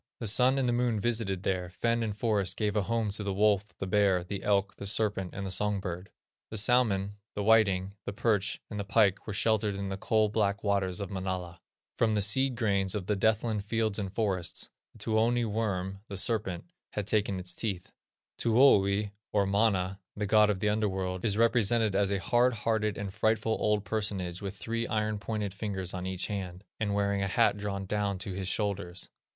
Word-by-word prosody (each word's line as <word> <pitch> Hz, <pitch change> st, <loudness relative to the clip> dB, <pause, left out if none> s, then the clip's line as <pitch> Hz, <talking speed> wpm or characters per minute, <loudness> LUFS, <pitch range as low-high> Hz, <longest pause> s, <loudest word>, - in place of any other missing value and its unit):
The 115 Hz, -, -4 dB
Sun 125 Hz, +5 st, +4 dB
and 130 Hz, -2 st, +1 dB
the 120 Hz, -, +2 dB
Moon 120 Hz, -2 st, +1 dB
visited 105 Hz, -5 st, -1 dB
there; 90 Hz, -2 st, -1 dB
fen 115 Hz, +6 st, 0 dB
and 105 Hz, -2 st, -3 dB
forest 100 Hz, -4 st, 0 dB
gave 105 Hz, -1 st, 0 dB
a 105 Hz, -, +3 dB
home 115 Hz, +1 st, -1 dB
to 105 Hz, +1 st, -2 dB
the 100 Hz, -1 st, -2 dB
wolf, 105 Hz, 0 st, +3 dB
the -, -, -4 dB
bear, 95 Hz, -2 st, +2 dB
the 95 Hz, +2 st, -5 dB
elk, 100 Hz, -1 st, +1 dB
the 100 Hz, -, -4 dB
serpent, 100 Hz, -3 st, +1 dB
and 100 Hz, 0 st, -4 dB
the 95 Hz, -, -3 dB
songbird; 95 Hz, -2 st, -1 dB, 0.4 s
the 110 Hz, -, -4 dB
salmon, 105 Hz, -3 st, +2 dB, 0.2 s
the 105 Hz, -, -2 dB
whiting, 100 Hz, -3 st, +3 dB
the -, -, -1 dB
perch, 100 Hz, -4 st, 0 dB
and 105 Hz, -, -4 dB
the -, -, -1 dB
pike 100 Hz, -1 st, +2 dB
were 105 Hz, -, -3 dB
sheltered 105 Hz, -1 st, +1 dB
in 100 Hz, 0 st, -4 dB
the 95 Hz, -, -3 dB
"coal 110 Hz, +2 st, +2 dB
black 100 Hz, -1 st, 0 dB
waters 100 Hz, -2 st, 0 dB
of 100 Hz, -, -5 dB
Manala." 95 Hz, -3 st, -4 dB, 0.4 s
From 110 Hz, -2 st, +3 dB
the 105 Hz, -, +2 dB
seed 130 Hz, +5 st, +3 dB
grains 100 Hz, -4 st, 0 dB
of 100 Hz, -3 st, -3 dB
the 105 Hz, -, 0 dB
death 110 Hz, +2 st, +2 dB
land 110 Hz, -4 st, -2 dB
fields 110 Hz, 0 st, 0 dB
and 95 Hz, -2 st, -3 dB
forests, 95 Hz, -5 st, -1 dB, 0.2 s
the -, -, -17 dB
Tuoni 115 Hz, +2 st, +1 dB
worm 100 Hz, -3 st, -2 dB
(the 100 Hz, -, -6 dB
serpent) 100 Hz, -4 st, 0 dB, 0.3 s
had 105 Hz, -, -2 dB
taken 100 Hz, -2 st, 0 dB
its 90 Hz, -1 st, -2 dB
teeth. 95 Hz, -3 st, -4 dB, 0.5 s
Tuoni, 105 Hz, -4 st, +4 dB, 0.2 s
or 100 Hz, -1 st, +2 dB
Mana, 100 Hz, -2 st, +1 dB, 0.2 s
the 105 Hz, -, -2 dB
god 105 Hz, +1 st, +5 dB
of 95 Hz, -3 st, -1 dB
the 105 Hz, -, +2 dB
under 105 Hz, 0 st, +1 dB
world, 95 Hz, -1 st, -3 dB
is 105 Hz, -2 st, +1 dB
represented 115 Hz, -2 st, +3 dB
as 100 Hz, 0 st, +2 dB
a 100 Hz, -1 st, 0 dB
hard 120 Hz, +4 st, +2 dB
hearted, 110 Hz, -1 st, 0 dB
and 100 Hz, -2 st, -5 dB
frightful, 110 Hz, +1 st, +1 dB
old 105 Hz, -1 st, +1 dB
personage 100 Hz, -5 st, -2 dB
with 100 Hz, -1 st, -5 dB
three 115 Hz, +2 st, -3 dB
iron 110 Hz, -1 st, -1 dB
pointed 105 Hz, -2 st, -3 dB
fingers 100 Hz, -3 st, -4 dB
on 90 Hz, 0 st, -4 dB
each 95 Hz, -1 st, -2 dB
hand, 95 Hz, -3 st, -5 dB, 0.2 s
and 105 Hz, -2 st, 0 dB
wearing 100 Hz, -1 st, +1 dB
a 95 Hz, -, 0 dB
hat 95 Hz, -, +3 dB
drawn 100 Hz, -1 st, -4 dB
down 100 Hz, 0 st, -1 dB
to 95 Hz, +1 st, -5 dB
his 95 Hz, 0 st, -4 dB
shoulders. 100 Hz, -3 st, -2 dB
100 Hz, 200 wpm, -29 LUFS, 95-110 Hz, 0.5 s, god